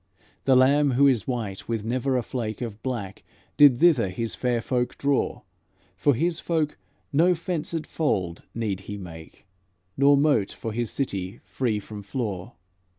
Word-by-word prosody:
The 135 - +5
Lamb 140 +2 +4
Who 140 +3 +5
is 130 -6 +3
white 110 -7 -4
with 115 -2 -2
never 130 +3 0
a 125 - -1
flake 110 -3 -4
Of 110 -3 -6
black, 115 -8 -4 0.3
did 145 -4 +7
thither 140 - +4
His 115 +5 -3
fair 125 -2 0
folk 125 +1 -1
draw; 140 -1 0 0.5
For 125 +9 +2
His 170 +5 0
flock 160 -3 -1 0.4
no 175 +5 +4
fenced 165 -1 -3
fold 95 - -2
need 105 -5 -2
He 105 - -4
make, 80 -2 -11 0.5
Nor 140 +1 +5
moat 140 -9 +2
for 115 - -5
His 120 0 -1
city 100 -5 -3
free 115 -5 -1
from 105 0 -9
flaw." 100 -4 -4
125 Hz, 155 wpm, -25 LUFS, 105-140 Hz, 0.5 s, did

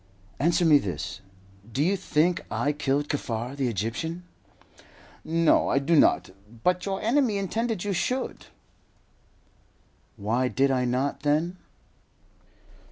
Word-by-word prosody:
"Answer 170 +3 +2
me 150 -3 +7
this. 90 - -5 0.5
Do 135 +5 0
you 190 +5 +2
think 175 -1 +1
I 145 - 0
killed 145 0 -1
Kaffar, 125 -3 -3
the 135 -2 -1
Egyptian?" 120 - -3 1.0
"No, 165 0 +3
I - - +2
do 145 +5 +2
not; 145 - +4 0.3
but 180 +2 +1
your 195 0 -1
enemy 235 -2 +2
intended 220 +1 -2
you 205 -1 -1
should." 255 +8 -2 1.7
"Why 115 +5 0
did 135 +2 +2
I 130 -1 +1
not, 130 +3 -1
then?" 155 +5 0
150 Hz, 120 wpm, -26 LUFS, 130-180 Hz, 1.7 s, me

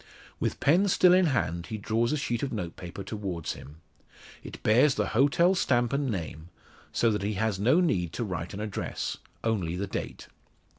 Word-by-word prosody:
With - - -2
pen 175 +8 +4
still 180 -1 +5
in 185 -1 +5
hand, 85 - -1
he 110 - -4
draws 110 +3 0
a 150 - +1
sheet 120 -5 -2
of 140 - -2
notepaper 90 -2 -6
towards 95 -7 -4
him. 75 +3 -13 0.6
It - - -10
bears 125 +6 +4
the - - 0
hotel 145 +9 +4
stamp 120 -9 +1
and 140 -1 0
name, 85 -5 -5 0.4
so 115 - +2
that 105 -1 -1
he 105 +2 -1
has 110 -1 0
no 125 - +4
need 90 - +1
to 120 - -2
write 90 -2 -4
an - - -6
address 105 -3 -3 0.3
only 95 -7 0
the 95 +3 -2
date. 95 - -6
110 Hz, 185 wpm, -28 LUFS, 90-135 Hz, 0.6 s, still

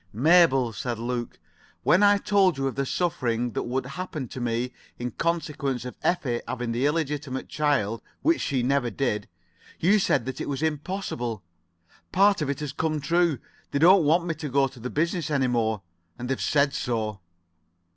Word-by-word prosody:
"Mabel," 135 - +4
said 120 +3 -3
Luke, 120 +1 -4 0.5
"when 185 - +4
I 205 0 +6
told 195 -5 +3
you 135 - -1
of 135 - -1
the 140 -1 -2
suffering 125 -9 -1
that - - -3
would 130 +1 -1
happen 150 0 -5
to 130 - -7
me 120 +1 -1 0.2
in 120 0 -4
consequence 150 -6 -2
of 125 - -5
Effie 130 -9 0
having 120 -2 -3
the 125 +4 +1
illegitimate 150 -3 -2
child, 115 -8 0 0.2
which 330 +1 +3
she 130 -4 0
never 130 -1 +1
did, 105 -4 -1 0.5
you 200 +6 +4
said 120 - +1
that 130 - -5
it - - -3
was 140 +1 -2
all 160 - +4
impossible. 145 - -4 0.7
Part 200 -1 +4
of 150 - -1
it 140 +1 -2
has 145 -2 -4
come 155 -1 -1
true. 170 +1 +2 0.3
They - - -1
don't 175 +4 +6
want 165 +4 +3
me 170 - -1
to 155 -1 -6
go 135 +1 +3
to 130 -1 -15
the 125 +2 -5
business 165 +2 -1
any 140 -3 +2
more, 110 -4 0 0.3
and 125 - -5
they've 135 - -1
said 140 -1 +2
so." 110 -6 -2
140 Hz, 185 wpm, -26 LUFS, 120-160 Hz, 0.7 s, I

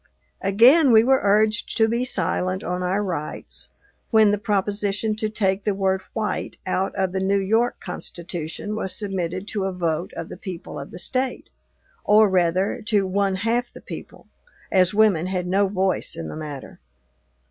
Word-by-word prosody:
Again 245 +9 +6
we 220 -1 +7
were 265 +2 +4
urged 215 +2 +2
to 220 -1 +4
be 235 +2 0
silent 185 -3 -1
on 180 +1 -2
our 190 +3 0
rights, 170 -6 -5 0.4
when 220 -3 +5
the 205 - 0
proposition 205 +1 -1
to 215 0 -1
take 195 -2 0
the 205 -2 0
word 190 -1 +1
"white" 220 -2 -3
out 185 +1 -1
of 190 -2 0
the 190 - -2
New 195 +1 +2
York 220 +5 +1
Constitution 170 +4 -6
was 190 -3 0
submitted 190 -2 -3
to 200 -3 -2
a 195 - -1
vote 170 -1 -2
of - - -6
the - - -8
people 180 -4 -7
of - - -8
the - - -10
State, 255 +8 -2 0.5
or, 215 +1 +6
rather, 185 +4 +1
to 205 -3 +2
one 195 0 0
half 235 +5 -1
the - - -12
people, - - -10 0.5
as 185 -1 +4
women 205 -5 +3
had 185 -1 -2
no 195 +3 +2
voice 190 -1 -1
in 80 -1 -6
the - - -7
matter. 150 -3 -8
195 Hz, 170 wpm, -23 LUFS, 185-215 Hz, 0.5 s, we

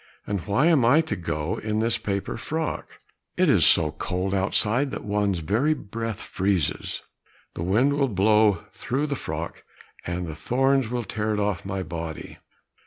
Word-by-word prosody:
And 100 -3 -3
why 105 +9 +3
am 160 -7 +5
I 140 +7 +6
to 160 - -3
go 80 -2 -2
in 110 0 -2
this 115 +2 +1
paper 100 -1 -2
frock? 160 0 -4 0.4
It - - +4
is - - +5
so 80 -3 +5
cold 90 +4 -2
outside 105 +7 +1
that - - -6
one's 100 -4 0
very 120 - +2
breath 115 -1 -5
freezes! 95 -5 -1 0.5
The - - -6
wind 110 +11 +3
will 140 -1 +2
blow 105 -1 +3
through 135 +4 -2
the 145 -1 -2
frock, - - -5 0.4
and 90 0 -3
the 80 - -5
thorns 130 - +1
will 120 0 -2
tear 105 +1 -2
it - - -1
off 100 -4 -1
my 95 -1 -3
body." 80 -1 -6
105 Hz, 170 wpm, -25 LUFS, 90-125 Hz, 0.5 s, I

